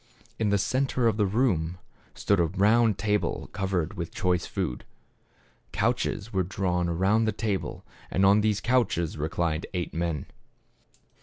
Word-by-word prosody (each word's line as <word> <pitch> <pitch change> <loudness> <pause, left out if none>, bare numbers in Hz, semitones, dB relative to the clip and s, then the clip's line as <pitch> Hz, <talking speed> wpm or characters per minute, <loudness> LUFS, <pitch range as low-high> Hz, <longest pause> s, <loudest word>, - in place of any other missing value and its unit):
In 110 -2 +1
the 100 - +3
center 130 +3 +1
of 110 - +1
the 105 -2 +2
room, 95 -7 +1 0.4
stood 100 -2 +1
a 85 - +4
round 105 +5 +3
table 105 +1 -1
covered 95 -4 -1
with 85 -2 -5
choice 90 -2 0
food. - - -3 0.9
Couches 105 +2 -1
were 95 - +2
drawn 90 -2 -1
around 95 +6 +2
the 110 - +1
table, 105 -2 -3 0.2
and 95 - +2
on 100 +2 +5
these 105 0 +1
couches 115 -10 +1
reclined 80 +1 -1
eight 90 -1 -3
men. 80 -3 -2
95 Hz, 145 wpm, -27 LUFS, 85-105 Hz, 0.9 s, on